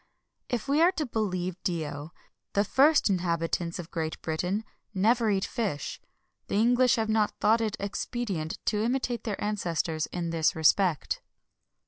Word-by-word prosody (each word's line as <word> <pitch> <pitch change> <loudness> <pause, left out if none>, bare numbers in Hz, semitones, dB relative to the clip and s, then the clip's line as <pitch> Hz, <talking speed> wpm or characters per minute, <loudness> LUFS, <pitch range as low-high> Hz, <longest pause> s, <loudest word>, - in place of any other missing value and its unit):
If 245 +1 -2
we 290 +3 +3
are 345 +2 +6
to 315 -4 -2
believe 185 -6 -2
Dio,[XXI 155 -4 -3
23] - - -31 0.4
the 200 - +3
first 290 +8 +4
inhabitants 170 -1 -1
of 175 -2 -8
Great 160 -2 -3
Britain 180 +7 -1 0.3
never 225 +4 +3
eat 195 -2 +1
fish. 205 - -3 0.5
The - - -2
English 245 +3 +4
have 225 -2 0
not 220 -1 +1
thought 225 +2 +4
it 215 -2 -1
expedient 200 -4 -3
to 210 -1 +1
imitate 245 -1 -1
their 210 -4 -3
ancestors 170 -6 -1
in 170 -2 -3
this 160 -1 +2
respect. 160 0 +2
200 Hz, 150 wpm, -28 LUFS, 170-230 Hz, 0.5 s, are